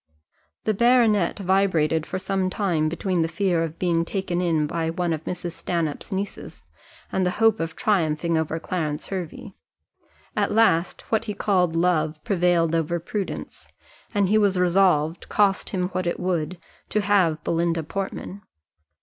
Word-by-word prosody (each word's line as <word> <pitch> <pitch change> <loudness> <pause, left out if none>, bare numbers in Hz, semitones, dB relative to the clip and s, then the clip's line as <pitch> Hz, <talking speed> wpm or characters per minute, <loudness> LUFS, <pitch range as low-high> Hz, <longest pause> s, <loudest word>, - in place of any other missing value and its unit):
The 215 - +1
baronet 230 -4 +3
vibrated 180 -5 +1
for 185 - -3
some 190 0 -1
time 175 -6 0
between 175 +1 -1
the 160 - +1
fear 180 -1 0
of 165 0 -5
being 170 -2 +1
taken 180 -1 -2
in 165 -4 +1
by 165 +1 -2
one 170 0 -1
of 155 0 -4
Mrs. 175 -1 -4
Stanhope's 165 0 -3
nieces, 195 +1 -5 0.5
and 190 - +1
the 180 - +2
hope 225 -1 +4
of 165 0 -3
triumphing 170 -4 +1
over 160 0 -1
Clarence 155 -4 -3
Hervey. 190 +2 -6 0.8
At - - +1
last, 205 -6 +2
what 225 0 +1
he 210 -2 -4
called 180 -5 +1
love 160 -3 +1
prevailed 175 -3 +2
over 165 +1 0
prudence, 195 +4 -5 0.4
and 205 -3 +2
he 215 +3 +4
was 200 -3 +2
resolved, 175 -3 +2
cost 200 -2 +2
him 180 -2 -1
what 185 -1 -2
it 170 - -1
would, 180 -1 -1 0.3
to 215 - +1
have 185 -6 +2
Belinda 170 -1 0
Portman. 195 +3 -5
180 Hz, 155 wpm, -24 LUFS, 165-195 Hz, 0.8 s, hope